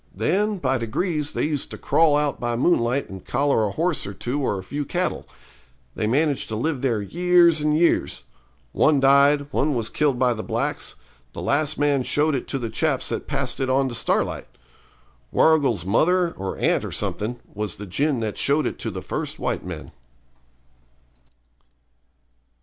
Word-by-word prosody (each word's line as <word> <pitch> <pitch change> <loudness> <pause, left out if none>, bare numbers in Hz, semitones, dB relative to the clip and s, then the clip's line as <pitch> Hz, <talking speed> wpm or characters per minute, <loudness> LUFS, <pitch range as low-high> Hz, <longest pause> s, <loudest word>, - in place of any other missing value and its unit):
Then, 210 +2 0
by 130 -6 0
degrees, 150 - -2
they - - -1
used 150 -3 -2
to - - -8
crawl 160 -3 +3
out 150 -2 -1
by 120 -1 -1
moonlight 125 -1 +1
and 95 -2 -9
collar 135 -4 +1
a - - -4
horse 165 - -1
or 100 - -7
two 135 +4 -3
or 105 -7 0
a 95 - -6
few 145 +9 -4
cattle. 180 +6 -2 0.7
They 110 - -2
managed 145 +4 +1
to 110 - -4
live 135 +4 -1
there 115 -6 0
years 175 - +3
and 150 0 +2
years; 170 +1 +1 0.5
one 150 - +3
died, 140 +2 +5
one 145 0 +1
was 115 -2 -2
killed 145 -4 +1
by 125 -1 +2
the 110 - -5
blacks; - - -3 0.4
the - - -6
last 150 +2 +1
man 145 -2 +2
showed 150 +4 +1
it 130 - -3
to 135 - -2
the 115 -4 -4
chaps 150 -5 0
that - - -4
passed 135 -2 -2
it 130 -1 -1
on 135 0 +2
to - - -6
Starlight. 115 - 0 0.8
Warrigal's 140 - +3
mother, 170 - +2
or 95 -8 -5
aunt - - +1
or - - -5
something, 120 +4 -3
was 105 -3 -3
the 105 - -8
gin 135 - 0
that 110 -2 -3
showed 145 +1 +2
it - - -3
to - - -3
the - - -6
first - - -4
white - - -2
men.' - - -7
140 Hz, 180 wpm, -23 LUFS, 120-155 Hz, 0.8 s, died